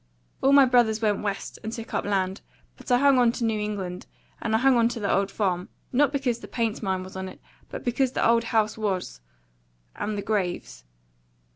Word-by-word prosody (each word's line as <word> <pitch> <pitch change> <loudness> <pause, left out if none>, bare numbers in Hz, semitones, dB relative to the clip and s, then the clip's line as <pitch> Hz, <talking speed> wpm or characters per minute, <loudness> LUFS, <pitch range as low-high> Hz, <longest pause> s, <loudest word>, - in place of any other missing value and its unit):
All 270 - +4
my 280 -1 +8
brothers 240 -3 +3
went 210 -2 +1
West, 200 -1 -4
and 220 - -4
took 230 -1 -7
up - - -1
land; 195 -1 -1 0.3
but - - -12
I 245 - +6
hung 275 0 +5
on 240 -2 +5
to 240 - -4
New 220 -1 0
England 195 -4 -4 0.3
and 220 -1 0
I - - +5
hung 260 +2 +4
on 230 -1 +4
to 240 -1 -5
the 200 -2 0
old 195 0 +1
farm, 185 -3 -1 0.2
not 280 +2 +4
because 260 -5 -1
the - - -10
paint 230 -3 -2
mine 190 -3 -1
was 185 0 -11
on 190 0 -4
it, - - -13 0.3
but - - -7
because 250 +1 0
the - - +2
old 230 0 +3
house 220 -1 +1
was 185 - -2 0.7
and 210 0 -3
the 200 - -3
graves. 185 - -2
220 Hz, 215 wpm, -26 LUFS, 195-240 Hz, 0.7 s, my